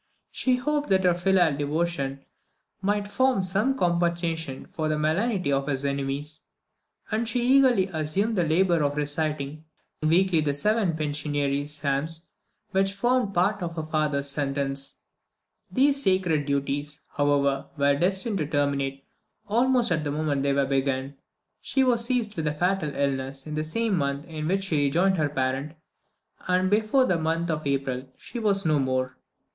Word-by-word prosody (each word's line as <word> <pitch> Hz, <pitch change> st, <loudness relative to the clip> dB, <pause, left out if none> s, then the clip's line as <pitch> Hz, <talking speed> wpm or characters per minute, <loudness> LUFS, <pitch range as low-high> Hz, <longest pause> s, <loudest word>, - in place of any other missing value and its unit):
She 255 Hz, -1 st, +1 dB
hoped 295 Hz, +3 st, -1 dB
that 190 Hz, -1 st, +3 dB
her 180 Hz, -1 st, +4 dB
filial 175 Hz, -3 st, +2 dB
devotion 145 Hz, -2 st, -2 dB, 0.6 s
might 205 Hz, +1 st, 0 dB
form 255 Hz, -1 st, +2 dB
some 210 Hz, +9 st, +1 dB
compensation 170 Hz, -, -1 dB
for 155 Hz, -2 st, -3 dB
the 155 Hz, -, 0 dB
malignity 175 Hz, +2 st, 0 dB
of 135 Hz, 0 st, 0 dB
his 135 Hz, -1 st, -1 dB
enemies, 140 Hz, +2 st, -3 dB, 0.7 s
and 225 Hz, +2 st, 0 dB
she 245 Hz, -, 0 dB, 0.2 s
eagerly 250 Hz, -8 st, +4 dB
assumed 160 Hz, +9 st, 0 dB
the 180 Hz, -, +2 dB
labour 170 Hz, +1 st, +2 dB
of 145 Hz, 0 st, -1 dB
reciting 150 Hz, 0 st, -2 dB, 0.4 s
weekly 170 Hz, +2 st, +3 dB
the 145 Hz, -2 st, 0 dB
seven 210 Hz, +1 st, +1 dB
penitentiary 145 Hz, -2 st, -1 dB
psalms 150 Hz, +3 st, -2 dB, 0.4 s
which 195 Hz, 0 st, +1 dB
formed 240 Hz, 0 st, +1 dB
part 195 Hz, +4 st, +2 dB
of 170 Hz, -1 st, -4 dB
her 160 Hz, -, -3 dB
father's 150 Hz, -3 st, -1 dB
sentence. 140 Hz, -1 st, -2 dB, 0.7 s
These 275 Hz, +1 st, +3 dB
sacred 180 Hz, -, +1 dB
duties, 140 Hz, +1 st, -2 dB
however, 140 Hz, -1 st, +1 dB
were 140 Hz, 0 st, +3 dB
destined 190 Hz, -, 0 dB
to 150 Hz, -, -1 dB
terminate 140 Hz, -2 st, -1 dB, 0.4 s
almost 245 Hz, +1 st, +3 dB
at 160 Hz, -2 st, +1 dB
the 145 Hz, -, -2 dB
moment 145 Hz, -1 st, -1 dB
they 140 Hz, 0 st, +1 dB
were 140 Hz, 0 st, +2 dB
begun. 135 Hz, 0 st, -1 dB, 0.5 s
She 270 Hz, -, +1 dB
was 235 Hz, -3 st, +2 dB
seized 235 Hz, -4 st, -1 dB
with 160 Hz, -3 st, -2 dB
a 150 Hz, -, -1 dB
fatal 180 Hz, 0 st, 0 dB
illness 135 Hz, -1 st, -2 dB
in 155 Hz, -, -6 dB
the 155 Hz, 0 st, -1 dB
same 210 Hz, +5 st, 0 dB
month 140 Hz, +1 st, -2 dB
in 155 Hz, -2 st, -5 dB
which 195 Hz, +2 st, 0 dB
she 155 Hz, -7 st, +1 dB
rejoined 180 Hz, +7 st, +2 dB
her 150 Hz, -2 st, +1 dB
parent, 135 Hz, +2 st, -2 dB, 0.7 s
and 185 Hz, +1 st, +2 dB
before 220 Hz, +5 st, +3 dB
the 180 Hz, -8 st, +1 dB
month 165 Hz, +1 st, 0 dB
of 155 Hz, -2 st, -3 dB
April 135 Hz, -2 st, -2 dB
she 240 Hz, -, -7 dB
was 200 Hz, -4 st, +2 dB
no 155 Hz, -2 st, +3 dB
more. 130 Hz, -1 st, -1 dB
155 Hz, 160 wpm, -26 LUFS, 140-195 Hz, 0.7 s, her